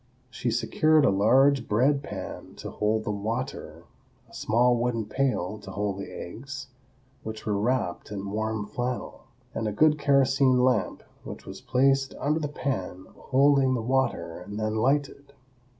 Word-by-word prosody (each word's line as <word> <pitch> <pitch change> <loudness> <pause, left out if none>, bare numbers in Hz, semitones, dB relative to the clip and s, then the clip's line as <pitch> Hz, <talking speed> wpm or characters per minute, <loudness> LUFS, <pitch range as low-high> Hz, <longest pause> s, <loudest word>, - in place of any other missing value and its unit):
She 120 - -2
secured 155 +6 +3
a - - +4
large 125 +6 +4
bread 135 +7 +2
pan 100 -9 -8
to - - -7
hold 110 +1 0
the 105 - -2
water, 115 +6 -4 0.4
a - - -22
small 120 +3 +2
wooden 120 -2 -1
pail 110 -4 -1
to 100 - -11
hold 100 0 -3
the 100 - -7
eggs, 130 +7 -8 0.5
which 110 0 -7
were 105 - 0
wrapped 105 -3 -1
in 100 -1 -5
warm 110 0 -2
flannel, 120 +4 -4 0.3
and 110 - -2
a - - -1
good 155 +7 +3
kerosene 135 -2 +3
lamp, 130 0 +1 0.2
which - - -9
was - - -9
placed 135 +1 +2
under 150 +3 +1
the 150 - -2
pan 95 -10 -4
holding 135 -1 +3
the 120 - -1
water 120 -10 -1
and 100 +4 -7
then 110 0 -1
lighted. 140 +3 0
120 Hz, 155 wpm, -27 LUFS, 105-135 Hz, 0.5 s, a